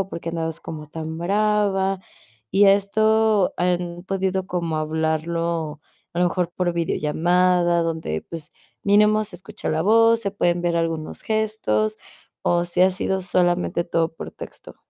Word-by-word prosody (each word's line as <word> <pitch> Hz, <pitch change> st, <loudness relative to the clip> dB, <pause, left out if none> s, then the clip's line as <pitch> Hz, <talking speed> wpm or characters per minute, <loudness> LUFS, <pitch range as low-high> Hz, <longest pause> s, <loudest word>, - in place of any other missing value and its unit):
o 195 Hz, -, -2 dB
por 170 Hz, -, -6 dB
qué 165 Hz, -, -6 dB
andabas 165 Hz, -1 st, -3 dB
como 155 Hz, -2 st, -7 dB
tan 160 Hz, +1 st, -6 dB
brava 195 Hz, 0 st, +1 dB, 0.5 s
y 200 Hz, +1 st, +5 dB
¿esto 215 Hz, +1 st, +3 dB
han 175 Hz, 0 st, -1 dB
podido 190 Hz, -1 st, -1 dB
como 170 Hz, -4 st, -2 dB
hablarlo 160 Hz, 0 st, -1 dB, 0.3 s
a 170 Hz, -, -2 dB
lo 180 Hz, -, +4 dB
mejor 175 Hz, 0 st, -2 dB
por 180 Hz, -1 st, 0 dB
videollamada? 175 Hz, +2 st, +2 dB
donde, 160 Hz, -, -3 dB
pues, 165 Hz, -2 st, -9 dB, 0.3 s
mínimo 210 Hz, +1 st, +4 dB
se 205 Hz, -3 st, -9 dB
escucha 195 Hz, +4 st, -7 dB
la 160 Hz, +1 st, +1 dB
voz, 225 Hz, +3 st, +5 dB
se 200 Hz, -, -2 dB
pueden 175 Hz, -3 st, 0 dB
ver 170 Hz, -1 st, +1 dB
algunos 165 Hz, -2 st, -2 dB
gestos 215 Hz, 0 st, 0 dB, 0.4 s
o 175 Hz, 0 st, +2 dB
si 175 Hz, +1 st, +1 dB
ha 185 Hz, -, +5 dB
sido 190 Hz, +1 st, -1 dB
solamente 180 Hz, -1 st, +1 dB
todo 165 Hz, -1 st, 0 dB
por -, -, -7 dB
texto. -, -, -11 dB
175 Hz, 155 wpm, -23 LUFS, 165-200 Hz, 0.5 s, y